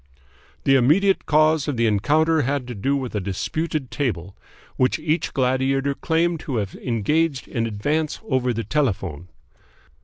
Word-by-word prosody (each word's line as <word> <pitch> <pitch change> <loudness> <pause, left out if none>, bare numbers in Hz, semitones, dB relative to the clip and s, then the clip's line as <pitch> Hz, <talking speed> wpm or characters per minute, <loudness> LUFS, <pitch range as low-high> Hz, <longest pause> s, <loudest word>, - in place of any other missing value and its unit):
"The 135 - +4
immediate 185 +10 +3
cause 155 0 +3
of 145 -4 -2
the 115 - +2
encounter 155 +10 +2
had 135 -1 -1
to - - -4
do 135 +7 0
with 130 -3 -3
a 105 - -1
disputed 135 - -3
table, 100 - -3 0.4
which 130 - +2
each 155 +1 -1
gladiator 135 +2 +1
claimed 165 +3 0
to 140 -4 -5
have 100 -4 -2
engaged 135 +5 -1
in 115 -2 -2
advance 145 +9 -1
over 130 -2 +1
the 115 -1 -2
telephone." 95 - -2
135 Hz, 150 wpm, -22 LUFS, 115-155 Hz, 0.4 s, The